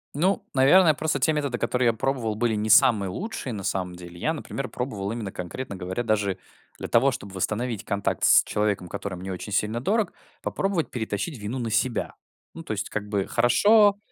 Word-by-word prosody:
Ну, 185 +7 +1
наверное, 155 +6 +6
просто 150 -2 -1
те 155 +4 +3
методы, 140 -5 -1
которые 125 +1 +1
я 115 - +4
пробовал, 115 -2 -1
были 115 0 +1
не 105 +1 -1
самые 105 -2 +5
лучшие 185 - -5
на 100 - -5
самом 90 -1 -2
деле. 85 0 -11
Я, 160 - 0
например, 135 -3 -5
пробовал 105 -6 -4
именно 110 -4 -4
конкретно 100 +6 -6
говоря 95 +6 -3
даже 105 -4 0 0.4
для - - -5
того, 120 +4 +4
чтобы 100 -6 -7
восстановить 110 +3 -2
контакт 100 -2 -2
с - - +7
человеком, 105 -3 -1
который 100 +1 -5
мне 95 +2 -6
очень 100 +3 -7
сильно 105 +3 0
дорог, 210 - 0 0.3
попробовать 195 -4 -1
перетащить 110 - -3
вину 105 +5 -4
на 115 -3 -3
себя. 125 +2 0 0.4
Ну, 165 - -8
то - - -4
есть, 105 -1 -4
как 105 -1 -3
бы, 100 -2 0
хорошо, 205 - +5
115 Hz, 190 wpm, -25 LUFS, 100-135 Hz, 0.4 s, с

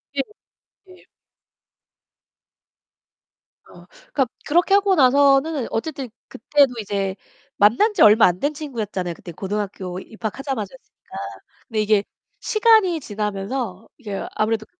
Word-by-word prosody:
예, 275 - +2 0.7
예. 365 0 -17 2.6
어 - - -16 0.3
그러니까 270 -3 +2 0.2
그렇게 350 +5 +3
하고 400 -1 +3
나서는 275 0 +4
어쨌든 270 0 -3 0.2
그때도 275 +2 +2
이제 195 -2 -2 0.4
만난 240 - +4
지 385 - -1
얼마 215 +1 +8
안 180 0 -1
된 290 +6 0
친구였잖아요. 215 - -4
그때 175 - -10
고등학교 195 -1 -4
입학하자마자였으니까. 225 +2 -7 0.5
근데 220 -2 -1
이게 210 -1 +2 0.4
시간이 430 -6 +3
지나면서 210 -2 -4
이게 205 -7 -5
아무래도 215 0 0
230 Hz, 280 characters per minute, -22 LUFS, 205-290 Hz, 2.6 s, 얼마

